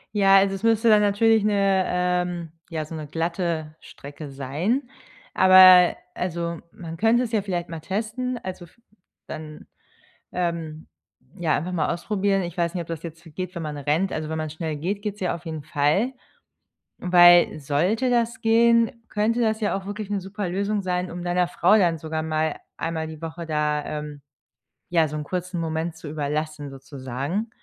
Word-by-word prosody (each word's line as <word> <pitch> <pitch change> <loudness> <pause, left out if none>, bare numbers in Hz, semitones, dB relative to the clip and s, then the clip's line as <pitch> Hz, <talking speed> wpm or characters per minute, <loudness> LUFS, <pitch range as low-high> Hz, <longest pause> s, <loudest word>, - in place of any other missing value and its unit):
Ja, 195 -1 +6
also 195 0 +3
es 195 - -9
müsste 225 0 +3
dann 210 -1 +6
natürlich 210 +1 +3
'ne, 195 -2 +2
ähm 180 -2 -1 0.2
ja 160 -3 -3
so 160 - -8
‘ne 155 -1 -6
glatte 165 -1 -2
Strecke 145 +1 -10
sein, 145 - -1 0.5
aber 185 -1 +8 0.2
also 170 -2 -3
man 165 -1 -8
könnte 225 +6 +3
es 235 - -4
ja 220 - +1
vielleicht 180 -3 -3
mal 165 -1 -6
testen, 225 +7 -3
also 185 -1 -6
v 170 - -23 0.5
dann, 155 -1 -8 0.7
ähm, 165 -3 -3 0.5
ja, 165 -3 +1
einfach 175 +5 -3
mal 170 -1 0
ausprobieren. 195 +2 0
Ich 175 0 -6
weiß 170 +1 0
nicht, 175 - -2
ob 165 - -12
das 165 -1 -5
jetzt 165 -1 -9
so 165 - -13
geht, 185 +4 -6
wenn 170 - -5
man 150 -1 -5
rennt. 150 +7 0
Also, 155 -1 -3
wenn 160 - -3
man 155 -1 -3
schnell 155 0 -4
geht, 185 +7 -3
geht's 210 -1 -4
ja 185 - 0
auf 170 +1 -10
jeden 160 -2 -5
Fall, 155 - +1 0.9
weil 175 -2 +6
sollte 180 - 0
das 235 -1 +1
gehen, 230 +1 +3
könnte 220 +3 +1
das 220 -1 +1
ja 210 -2 0
auch 195 - -9
wirklich 205 0 -5
'ne 205 -1 -1
super 195 +1 -5
Lösung 200 +3 -1
sein, 180 -1 -2
um 175 0 -6
deiner 180 0 +1
Frau 180 +3 +4
dann 175 -5 +2
sogar 160 0 -4
mal 155 -1 -1 0.2
einmal 160 -1 -3
die 155 0 -9
Woche 165 +1 -6
da, 150 -1 0
ähm, 150 -1 -6 0.7
ja, 165 -2 +3
so 150 - -6
'n 150 - -3
kurzen 180 +2 -4
Moment 160 +1 -2
zu 160 -2 -9
überlassen, 150 0 -3
sozusagen, 135 - -5
175 Hz, 180 wpm, -24 LUFS, 155-200 Hz, 0.9 s, aber